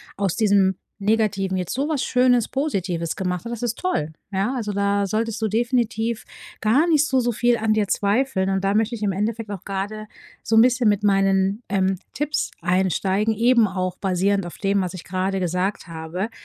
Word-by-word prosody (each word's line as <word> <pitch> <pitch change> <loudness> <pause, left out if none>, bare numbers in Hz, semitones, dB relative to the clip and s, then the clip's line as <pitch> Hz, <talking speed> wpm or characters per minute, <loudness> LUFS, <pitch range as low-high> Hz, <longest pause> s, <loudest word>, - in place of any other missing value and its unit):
aus 195 -3 -1
diesem 200 -4 +3 0.2
Negativen 200 -2 0
jetzt 180 -2 -3
so 275 +4 -1
was 300 -4 0
Schönes 250 -2 +3
Positives 185 - -2
gemacht 180 -2 -2
hast. 235 - -6
Das 235 0 -5
ist 235 -1 -1
toll. 160 - -1 0.2
Ja, 195 +6 0
also, 220 -5 -2
da 200 0 +1
solltest 225 +2 -2
du 220 - +1
definitiv 230 0 0 0.4
gar 260 +10 +3
nicht 310 -3 +4
so 265 -4 +2
so 240 -1 0
viel 240 +2 +2
an 220 -1 +1
dir 210 -2 0
zweifeln 205 -1 +1
und 195 0 0
da 195 0 +2
möchte 220 +2 +1
ich 215 - -6
im 200 - +1
Endeffekt 215 +3 -2
auch 195 -2 -7
grade 205 +2 -4 0.3
so 225 - 0
'n 225 - +8
bisschen 250 -1 +3
mit 205 -1 +2
meinen, 195 +1 +2
ähm, 190 -1 +1 0.2
Tipps 295 +1 -1
einsteigen, 190 +4 +1
eben 235 +1 +4
auch 185 -1 -3
basierend 195 0 0
auf 175 - -8
dem, 200 0 +1
was 180 -2 -3
ich 185 - -8
grade 190 +1 -2
gesagt 180 +3 -1
habe. 165 +5 -4
205 Hz, 195 wpm, -22 LUFS, 190-230 Hz, 0.4 s, n